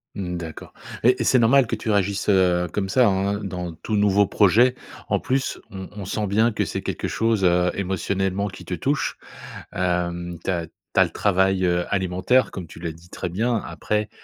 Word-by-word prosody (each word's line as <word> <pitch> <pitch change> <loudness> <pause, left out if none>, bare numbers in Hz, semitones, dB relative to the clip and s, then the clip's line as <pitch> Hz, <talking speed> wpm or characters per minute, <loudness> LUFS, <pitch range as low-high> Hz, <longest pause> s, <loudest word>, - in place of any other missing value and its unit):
Mmh, 90 -3 -3
d'accord 80 -2 -8 0.3
et 125 +2 +4
et - - +2
c'est 130 - +4
normal 125 +2 +5
que 115 - -1
tu 110 0 -5
réagisses, 100 0 +1
heu, 90 -2 +3
comme 95 -2 -2
ça, 125 +3 +4
hein, 100 +1 +1
heu, - - -4
dans 90 -3 -4
tout 105 +6 -4
nouveau 100 0 +4
projet, 120 +6 +4 0.3
en - - +2
plus 135 +1 -1
on 95 -1 -8
on 100 -3 -6
sent 105 +2 -2
bien 110 +4 +3
que - - -1
c'est - - -4
quelque - - -3
chose, 110 -3 0
heu, 90 0 +3
émotionnellement 95 +1 -1
qui 95 0 -10
te 90 - -5
touche. 140 - -1 0.6
Hem, 90 -1 -1
tu - - 0
as 85 -2 -2 0.3
tu - - +5
as - - +8
le - - -7
travail, 95 -1 +2
heu, 90 0 +1
alimentaire 95 +7 +2
comme 90 -3 -6
tu 80 - -12
l'as 85 -1 -4
dit 85 +2 -16
très 90 - -4
bien 115 +7 0
après, 105 0 -2
95 Hz, 205 wpm, -23 LUFS, 90-105 Hz, 0.6 s, as